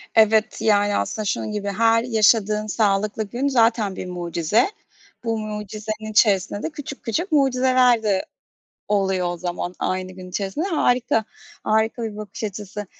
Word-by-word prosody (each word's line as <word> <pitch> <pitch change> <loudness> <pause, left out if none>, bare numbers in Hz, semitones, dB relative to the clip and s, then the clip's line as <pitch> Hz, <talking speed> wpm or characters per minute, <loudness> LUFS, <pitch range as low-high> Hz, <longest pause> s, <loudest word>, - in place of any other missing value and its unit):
Evet, 220 0 +4
yani 205 -1 +3
aslında 215 - -2
şunun 210 - -2
gibi 205 -1 -4
her 225 +3 +3
yaşadığın 215 -2 +2
sağlıklı 210 0 0
gün 245 +7 -2
zaten 225 -6 +2
bir - - -5
mucize. 175 - 0 0.5
Bu 225 -1 -1
mucizenin 215 +1 -5
içerisinde 205 -1 +2
de - - -1
küçük 290 -2 -8
küçük 325 - -2
mucizeler 255 -4 +3
de 200 -3 +1 0.6
oluyor 190 -3 +1
o 175 - -5
zaman 175 +1 -4
aynı 185 0 -2
gün 185 0 -10
içerisinde. 200 - -3
Harika! 245 - +1 0.4
Harika 220 +2 +1
bir 220 -2 -4
bakış 215 +1 -7
açısı. 205 0 -6
215 Hz, 145 wpm, -22 LUFS, 200-230 Hz, 0.6 s, Evet